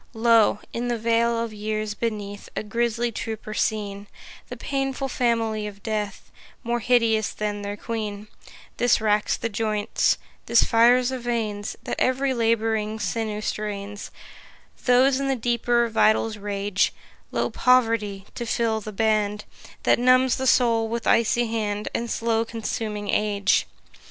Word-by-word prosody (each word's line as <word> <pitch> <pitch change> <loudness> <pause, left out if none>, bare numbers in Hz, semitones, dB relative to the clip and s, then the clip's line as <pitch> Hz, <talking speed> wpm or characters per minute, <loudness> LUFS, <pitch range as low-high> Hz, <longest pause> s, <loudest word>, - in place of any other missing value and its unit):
Lo, 225 -2 +4
in 240 +1 -2
the 240 -1 0
vale 230 +1 +2
of 230 -1 -3
years 215 0 -3
beneath 210 -3 -4
A - - -2
griesly 235 +2 -1
troop 220 0 -5
are 215 - -5
seen, 205 -2 -2 0.4
The - - -7
painful 270 -1 -2
family 225 -4 0
of 200 -1 -11
Death, 210 -3 -4 0.3
More 235 +1 -1
hideous 225 -2 +2
than 210 -1 -3
their 205 0 -5
Queen: 210 -2 -5 0.5
This 245 +1 +3
racks 210 -1 +1
the - - -2
joints, 215 -1 0 0.3
this 235 0 +5
fires 245 +2 +4
the 260 -1 -3
veins, 225 -4 -3
That - - -4
ev'ry 265 +1 +2
labouring 225 -2 0
sinew 215 -1 -2
strains, 205 -1 -4 0.8
Those 260 +2 +4
in 275 - -1
the 270 - +1
deeper 240 0 +1
vitals 220 0 +2
rage: 200 -1 -1 0.4
Lo, - - -1
Poverty, 225 -6 +2
to 235 - -5
fill 225 -1 0
the 215 - -7
band, 210 0 0 0.4
That - - +4
numbs 255 +1 +4
the 265 0 -1
soul 230 -2 +3
with 235 +1 -3
icy 235 +1 +3
hand, 215 -2 -2
And 235 0 -2
slow 225 0 0
consuming 215 -3 -4
Age. 205 -1 +2
225 Hz, 145 wpm, -24 LUFS, 210-235 Hz, 0.8 s, this